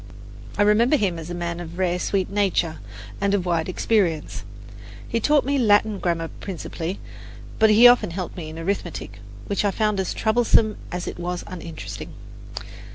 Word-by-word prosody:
I 205 - +4
remember 225 +7 +4
him 185 -8 0
as 160 +1 -8
a 175 - -4
man 170 0 -3
of 170 0 -8
rare, 180 -1 +1
sweet 190 0 0
nature 190 -5 0 0.4
and 200 0 +2
of 185 -3 -1
wide 170 -1 0
experience. 185 -5 0 0.6
He 230 - 0
taught 290 +4 +3
me 280 +1 +1
Latin 210 -2 +3
grammar 165 -2 -1
principally; 180 -1 -5 0.6
but 220 - +6
he 225 +3 +8
often 245 -5 +5
helped 180 +1 -5
me 165 -4 -6
in 160 - -9
arithmetic, 165 - -4 0.3
which 200 - -1
I 205 - +3
found 210 0 0
as 190 - -2
troublesome 220 -1 +3
as 180 0 -3
it - - -6
was 175 0 -3
uninteresting. 170 -3 -7
190 Hz, 165 wpm, -23 LUFS, 170-210 Hz, 0.6 s, he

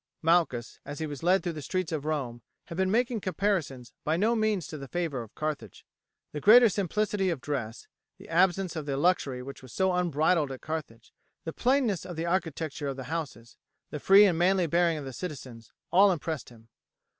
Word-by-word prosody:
Malchus, 160 -8 +1
as 145 - -7
he 160 - -3
was 145 -3 -7
led 185 +3 +3
through 175 -3 -2
the 155 - -7
streets 185 +3 -2
of 150 -3 -3
Rome, 135 -6 -3 0.2
had 170 - -8
been 190 +1 +1
making 235 +1 +1
comparisons 170 - -2
by 155 +2 0
no 220 +5 +2
means 215 -5 0
to 155 - -7
the 135 - -8
favour 165 -5 -2
of 115 - -12
Carthage. 155 -1 -5 0.5
The 150 - -5
greater 235 - +8
simplicity 200 0 0
of 165 -5 -2
dress, 125 -6 -5 0.3
the - - -14
absence 180 +1 +2
of 155 -2 -5
the 135 -1 -1
luxury 140 -6 +1
which 140 +1 -9
was 130 -2 -13
so 190 -1 +1
unbridled 165 -3 +1
at 130 - -8
Carthage, 150 -8 -6 0.3
the 160 - -5
plainness 250 -7 +1
of 175 - -7
the 165 +1 -3
architecture 165 -4 -2
of 135 -1 -4
the 130 +1 -7
houses, 120 -8 -6 0.3
the 150 - -4
free 195 +6 +7
and 175 -5 +1
manly 185 0 +3
bearing 170 0 +2
of 145 - -6
the 135 - -7
citizens, 130 -9 -8 0.2
all 195 +3 +6
impressed 160 -4 -4
him. 115 -1 -18
165 Hz, 200 wpm, -28 LUFS, 140-185 Hz, 0.5 s, greater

